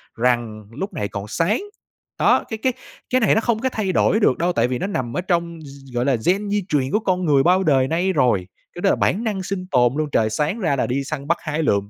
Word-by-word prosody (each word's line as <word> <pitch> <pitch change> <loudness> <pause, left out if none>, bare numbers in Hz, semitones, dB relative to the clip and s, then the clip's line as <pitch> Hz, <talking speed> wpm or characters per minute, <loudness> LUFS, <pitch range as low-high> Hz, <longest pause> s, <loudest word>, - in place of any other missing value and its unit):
rằng 115 -3 0
lúc 190 - -5
này 100 - -2
còn 100 +1 -6
sáng. 180 - 0 0.6
Đó, - - +4
cái 220 - -4
cái 260 -1 +2 0.4
cái 255 0 +2
này 215 - +4
nó 220 - +2
không 230 -2 0
có 260 +2 0
thay 205 -6 -2
đổi 215 +4 +2
được 130 - +3
đâu, 175 +1 0
tại 115 +1 +2
vì 125 -1 -2
nó 190 - -2
nằm 130 -10 -3
ở - - 0
trong 170 -2 -1
gi 135 -3 -13
gọi 120 +2 0
là, 135 -3 +3
gen 200 +3 +1
di 205 -1 0
truyền 135 -3 0
của 215 - +2
con 185 -3 -1
người 140 -3 +4
bao 185 +3 +3
đời 135 -5 +3
nay 180 +5 0
rồi, 115 - +2 0.3
cái 175 - -8
đó 195 - +3
là - - +3
bản 215 +6 0
năng 200 -4 -2
sinh 185 -1 -4
tồn 125 -1 +3
luôn, 155 -1 -1
trời 110 -4 +2
sáng 150 - -1
ra 160 -8 +1
là - - 0
đi 135 +2 -1
săn 140 0 -5
bắt 170 - +2
hái 155 0 -2
lượm, 100 -5 +1
160 Hz, 265 wpm, -21 LUFS, 130-190 Hz, 0.6 s, Đó